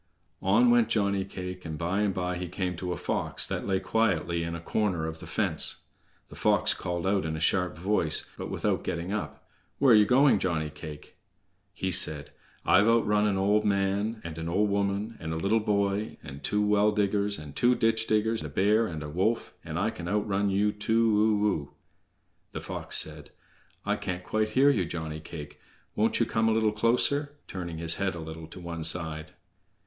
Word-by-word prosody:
On 245 Hz, 0 st, +4 dB
went 240 Hz, -1 st, +4 dB
Johnny 100 Hz, -2 st, +1 dB
cake, 90 Hz, -1 st, -7 dB
and 80 Hz, -2 st, -5 dB
by 90 Hz, +4 st, -1 dB
and 105 Hz, -2 st, +1 dB
by 90 Hz, -1 st, -2 dB
he 90 Hz, 0 st, -4 dB
came 90 Hz, 0 st, -3 dB
to 90 Hz, 0 st, -4 dB
a 90 Hz, -, -3 dB
fox -, -, 0 dB
that -, -, -3 dB
lay 95 Hz, -1 st, +1 dB
quietly 95 Hz, -4 st, 0 dB
in 85 Hz, 0 st, -3 dB
a -, -, -5 dB
corner 90 Hz, -1 st, -1 dB
of 80 Hz, 0 st, -6 dB
the -, -, -10 dB
fence. -, -, +1 dB, 0.5 s
The -, -, -12 dB
fox -, -, +2 dB
called 85 Hz, 0 st, -4 dB
out 95 Hz, 0 st, +1 dB
in 80 Hz, -1 st, -3 dB
a -, -, -4 dB
sharp 90 Hz, +1 st, +1 dB
voice, 85 Hz, -3 st, 0 dB
but -, -, -6 dB
without -, -, -1 dB
getting 85 Hz, +4 st, -3 dB
up: 105 Hz, -, -5 dB, 0.3 s
"Where 135 Hz, -4 st, +5 dB
ye 105 Hz, -1 st, +6 dB
going, 130 Hz, -2 st, +4 dB
Johnny 80 Hz, -5 st, -1 dB
cake?" 75 Hz, 0 st, -10 dB, 0.5 s
He 95 Hz, -, -3 dB
said: 75 Hz, -5 st, +4 dB, 0.3 s
"I've 100 Hz, +4 st, +5 dB
outrun 105 Hz, -2 st, +3 dB
an 100 Hz, -2 st, 0 dB
old 105 Hz, +2 st, +2 dB
man, 100 Hz, +2 st, 0 dB
and 85 Hz, -1 st, -7 dB
an 80 Hz, 0 st, -4 dB
old 100 Hz, +4 st, +1 dB
woman, 100 Hz, +3 st, -1 dB
and 80 Hz, 0 st, -4 dB
a -, -, -3 dB
little 100 Hz, +7 st, +2 dB
boy, 100 Hz, 0 st, -1 dB
and 70 Hz, -2 st, -9 dB
two 105 Hz, 0 st, +1 dB
well 105 Hz, 0 st, +3 dB
diggers, 100 Hz, 0 st, +1 dB
and 75 Hz, -2 st, -10 dB
two 125 Hz, +1 st, +3 dB
ditch 115 Hz, -1 st, +1 dB
diggers, 110 Hz, +1 st, +1 dB
a 75 Hz, -, -6 dB
bear, 105 Hz, +8 st, +2 dB
and 80 Hz, -5 st, -6 dB
a -, -, -6 dB
wolf, 95 Hz, +9 st, -1 dB
and 80 Hz, 0 st, -5 dB
I 105 Hz, +5 st, 0 dB
can 85 Hz, -4 st, -8 dB
outrun 100 Hz, 0 st, 0 dB
you 100 Hz, +2 st, +2 dB
too 110 Hz, 0 st, +2 dB
o -, -, +4 dB
o!" 75 Hz, -8 st, -2 dB, 0.8 s
The -, -, -5 dB
Fox -, -, -3 dB
said: 75 Hz, -1 st, +2 dB, 0.6 s
"I 105 Hz, +1 st, 0 dB
can't 90 Hz, -3 st, -4 dB
quite 110 Hz, +3 st, -1 dB
hear 140 Hz, +2 st, +6 dB
you, 105 Hz, -9 st, +1 dB
Johnny 80 Hz, -2 st, -5 dB
cake. 75 Hz, -2 st, -9 dB, 0.4 s
Won't 110 Hz, +2 st, +1 dB
you 115 Hz, -, +3 dB
come 110 Hz, 0 st, +1 dB
a -, -, +2 dB
little 110 Hz, -1 st, +2 dB
closer?" 140 Hz, +7 st, +1 dB
turning 85 Hz, -3 st, -6 dB
his 80 Hz, 0 st, +1 dB
head 95 Hz, -2 st, -1 dB
a -, -, -6 dB
little 80 Hz, 0 st, -8 dB
to 85 Hz, -, -11 dB
one 85 Hz, -2 st, -6 dB
side. 80 Hz, -2 st, -2 dB
95 Hz, 200 wpm, -28 LUFS, 85-105 Hz, 0.8 s, ye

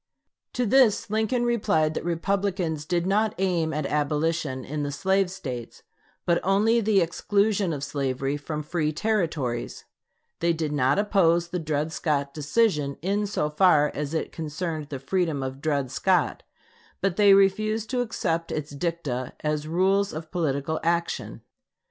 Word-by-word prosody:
To 250 Hz, -, 0 dB
this 225 Hz, -2 st, +3 dB
Lincoln 220 Hz, +3 st, +1 dB
replied 160 Hz, -10 st, +1 dB
that -, -, -4 dB
Republicans 175 Hz, -2 st, -1 dB
did 175 Hz, 0 st, 0 dB
not 210 Hz, +3 st, +1 dB
aim 175 Hz, -4 st, 0 dB
at 150 Hz, -1 st, -2 dB
abolition 150 Hz, -2 st, -1 dB
in 150 Hz, +1 st, -4 dB
the 145 Hz, 0 st, -2 dB
slave 190 Hz, +5 st, +1 dB
States, 130 Hz, -10 st, -7 dB, 0.4 s
but 170 Hz, -1 st, +3 dB
only 215 Hz, +5 st, +3 dB
the 205 Hz, -2 st, +3 dB
exclusion 200 Hz, +3 st, +1 dB
of 145 Hz, -3 st, -4 dB
slavery 135 Hz, -1 st, -2 dB
from 150 Hz, +1 st, -5 dB
free 155 Hz, 0 st, -1 dB
Territories; 160 Hz, -, -2 dB, 0.5 s
they 170 Hz, 0 st, +2 dB
did 160 Hz, -2 st, -2 dB
not 135 Hz, 0 st, +2 dB
oppose 175 Hz, -5 st, +2 dB
the 180 Hz, -, -2 dB
Dred 155 Hz, -1 st, -2 dB
Scott 140 Hz, -4 st, -1 dB
decision 150 Hz, -2 st, +1 dB
in 205 Hz, +3 st, 0 dB
so 195 Hz, -6 st, -1 dB
far 150 Hz, -3 st, +4 dB
as 150 Hz, +2 st, -3 dB
it 160 Hz, -, -2 dB
concerned 155 Hz, -1 st, -4 dB
the 140 Hz, -, -4 dB
freedom 155 Hz, 0 st, -1 dB
of 130 Hz, +1 st, -5 dB
Dred 140 Hz, -4 st, -1 dB
Scott, 180 Hz, +2 st, +1 dB, 0.6 s
but 195 Hz, -2 st, 0 dB
they 200 Hz, -1 st, +6 dB
refused 215 Hz, +3 st, +2 dB
to 250 Hz, -1 st, +1 dB
accept 170 Hz, -8 st, -2 dB
its 150 Hz, -1 st, -4 dB
dicta 140 Hz, -5 st, -3 dB
as 150 Hz, 0 st, -1 dB
rules 195 Hz, +4 st, +2 dB
of 155 Hz, 0 st, -7 dB
political 160 Hz, -2 st, -1 dB
action. 170 Hz, +1 st, -2 dB
165 Hz, 150 wpm, -25 LUFS, 150-195 Hz, 0.6 s, they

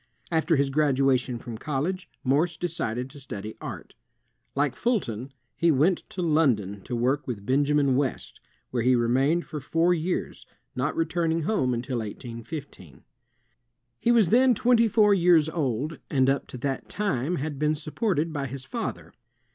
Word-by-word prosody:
After 160 Hz, 0 st, +2 dB
his 140 Hz, -1 st, +1 dB
graduation 135 Hz, -4 st, +2 dB
from 115 Hz, -1 st, -8 dB
college, 155 Hz, +7 st, -2 dB
Morse 155 Hz, +5 st, +1 dB
decided 125 Hz, -8 st, -2 dB
to 145 Hz, -, -11 dB
study 110 Hz, -5 st, -7 dB
art. -, -, -7 dB, 0.6 s
Like 145 Hz, -1 st, +1 dB
Fulton, 135 Hz, -, -1 dB, 0.2 s
he 170 Hz, -, +2 dB
went 160 Hz, +5 st, +3 dB
to 180 Hz, -, -4 dB
London 120 Hz, -, +1 dB
to 125 Hz, -, -3 dB
work 130 Hz, +5 st, 0 dB
with 105 Hz, -6 st, -5 dB
Benjamin 140 Hz, +1 st, +2 dB
West, 135 Hz, -1 st, -2 dB, 0.3 s
where 125 Hz, -, 0 dB
he 125 Hz, +2 st, +4 dB
remained 135 Hz, +8 st, +2 dB
for 155 Hz, -, -6 dB
four 165 Hz, +6 st, +2 dB
years, 175 Hz, +2 st, -3 dB, 0.3 s
not 130 Hz, +4 st, -1 dB
returning 165 Hz, 0 st, 0 dB
home 150 Hz, -9 st, +1 dB
until 125 Hz, +1 st, -2 dB
1815. 115 Hz, -, -8 dB, 1.0 s
He 235 Hz, -, +2 dB
was 225 Hz, -6 st, +4 dB
then 250 Hz, +1 st, +5 dB
twenty 235 Hz, +1 st, +4 dB
four 210 Hz, -1 st, +4 dB
years 170 Hz, -4 st, +5 dB
old, 150 Hz, -1 st, -2 dB
and 130 Hz, -1 st, +3 dB
up 140 Hz, -, -2 dB
to -, -, -8 dB
that 135 Hz, +1 st, -3 dB
time 180 Hz, -6 st, -1 dB
had 150 Hz, -2 st, -4 dB
been 150 Hz, +1 st, +2 dB
supported 160 Hz, +1 st, -1 dB
by 140 Hz, -2 st, -2 dB
his 130 Hz, +1 st, -7 dB
father. 235 Hz, -2 st, -5 dB
145 Hz, 155 wpm, -26 LUFS, 125-170 Hz, 1.0 s, then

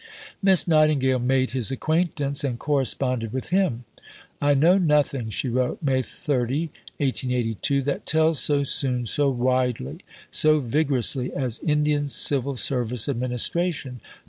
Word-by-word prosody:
Miss 190 Hz, -5 st, +4 dB
Nightingale 155 Hz, -5 st, +2 dB
made 130 Hz, +1 st, 0 dB
his 130 Hz, -3 st, +1 dB
acquaintance, 145 Hz, 0 st, -1 dB
and 130 Hz, -4 st, -2 dB
corresponded 130 Hz, -4 st, -1 dB
with 130 Hz, +1 st, -5 dB
him. 180 Hz, -11 st, 0 dB, 0.6 s
"I 145 Hz, 0 st, +3 dB
know 170 Hz, +7 st, +4 dB
nothing," 145 Hz, -8 st, +1 dB
she 110 Hz, +5 st, -2 dB
wrote 125 Hz, +4 st, -2 dB
(May 135 Hz, -2 st, +1 dB
30, 140 Hz, +4 st, -3 dB, 0.3 s
1882), 130 Hz, 0 st, -1 dB
"that 140 Hz, +1 st, -4 dB
tells 160 Hz, -1 st, +2 dB
so 145 Hz, -1 st, +1 dB
soon, 125 Hz, -3 st, -1 dB
so 140 Hz, +5 st, +1 dB
widely, 125 Hz, -, -1 dB, 0.3 s
so 155 Hz, 0 st, +3 dB
vigorously 130 Hz, -1 st, +1 dB
as 125 Hz, -4 st, -2 dB
Indian 150 Hz, -1 st, 0 dB
Civil 140 Hz, -1 st, +1 dB
Service 125 Hz, -2 st, 0 dB
administration. 130 Hz, -, -1 dB
135 Hz, 125 wpm, -23 LUFS, 125-150 Hz, 0.6 s, Miss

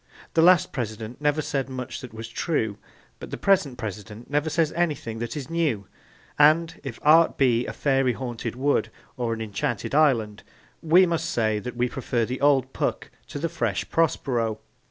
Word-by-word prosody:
The 165 Hz, -, +4 dB
last 180 Hz, 0 st, +5 dB
President 115 Hz, 0 st, -5 dB
never 150 Hz, +1 st, +1 dB
said 135 Hz, -2 st, -2 dB
much 130 Hz, -1 st, -6 dB
that 125 Hz, -, -9 dB
was 110 Hz, +1 st, -7 dB
true, 115 Hz, -5 st, -2 dB, 0.4 s
but -, -, -8 dB
the -, -, -5 dB
present 160 Hz, -10 st, +2 dB
President 110 Hz, +2 st, -7 dB
never 145 Hz, +2 st, +1 dB
says 160 Hz, 0 st, +1 dB
anything 150 Hz, -10 st, -2 dB
that 120 Hz, +3 st, -4 dB
is 140 Hz, -, -5 dB
new; 155 Hz, -11 st, -1 dB, 0.5 s
and, 160 Hz, +3 st, +4 dB
if 135 Hz, -6 st, -6 dB
art 160 Hz, +2 st, +5 dB
be 125 Hz, -3 st, +2 dB
a -, -, -3 dB
fairy 135 Hz, -3 st, +1 dB
haunted 120 Hz, -1 st, -5 dB
wood 140 Hz, +3 st, +1 dB, 0.3 s
or 120 Hz, -2 st, -2 dB
an 115 Hz, 0 st, -3 dB
enchanted 110 Hz, +3 st, -3 dB
island, 120 Hz, -9 st, +2 dB, 0.4 s
we 175 Hz, +4 st, +5 dB
must 165 Hz, -1 st, -1 dB
say 110 Hz, -5 st, +1 dB
that 125 Hz, +4 st, -7 dB
we 125 Hz, 0 st, +2 dB
prefer 120 Hz, -2 st, -1 dB
the 125 Hz, +3 st, -5 dB
old 135 Hz, -2 st, +3 dB
Puck -, -, -2 dB, 0.2 s
to -, -, -7 dB
the 160 Hz, +4 st, -1 dB
fresh 115 Hz, -, -2 dB
Prospero. 120 Hz, -9 st, 0 dB
130 Hz, 175 wpm, -25 LUFS, 115-155 Hz, 0.5 s, last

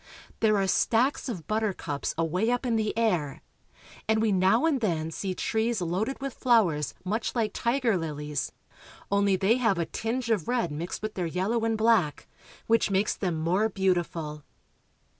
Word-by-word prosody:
There 215 Hz, -2 st, +3 dB
are 195 Hz, -, +2 dB
stacks 240 Hz, +8 st, +1 dB
of 180 Hz, -10 st, -5 dB
buttercups 200 Hz, -9 st, -2 dB
away 175 Hz, +7 st, 0 dB
up 245 Hz, +1 st, 0 dB
in 235 Hz, -2 st, +1 dB
the 220 Hz, 0 st, -1 dB
air, 175 Hz, -12 st, 0 dB, 0.6 s
and 220 Hz, 0 st, +3 dB
we 220 Hz, -1 st, +2 dB
now 190 Hz, -, +3 dB
and 290 Hz, -6 st, +1 dB
then 165 Hz, -6 st, -1 dB
see 185 Hz, +3 st, -3 dB
trees 225 Hz, +4 st, 0 dB
loaded 185 Hz, +9 st, -2 dB
with 275 Hz, -1 st, -4 dB
flowers 190 Hz, -, +2 dB
much 215 Hz, +5 st, -1 dB
Hke 220 Hz, -3 st, 0 dB
tiger 240 Hz, -1 st, +1 dB
liHes, 150 Hz, -3 st, -3 dB, 0.6 s
only 200 Hz, -1 st, +3 dB
they 195 Hz, +6 st, +3 dB
have 225 Hz, -7 st, +2 dB
a 170 Hz, -, 0 dB
tinge 230 Hz, +8 st, -3 dB
of 200 Hz, -8 st, 0 dB
red 240 Hz, -10 st, 0 dB
mixed 165 Hz, +7 st, -5 dB
with 215 Hz, 0 st, -3 dB
their 180 Hz, -3 st, -2 dB
yellow 195 Hz, +7 st, -1 dB
and 225 Hz, -1 st, 0 dB
black, 220 Hz, -9 st, +2 dB, 0.4 s
which 230 Hz, -1 st, +2 dB
makes 200 Hz, +1 st, +1 dB
them 180 Hz, -4 st, -2 dB
more 180 Hz, +7 st, +1 dB
beautiful. 175 Hz, -6 st, -1 dB
205 Hz, 165 wpm, -27 LUFS, 170-225 Hz, 0.6 s, There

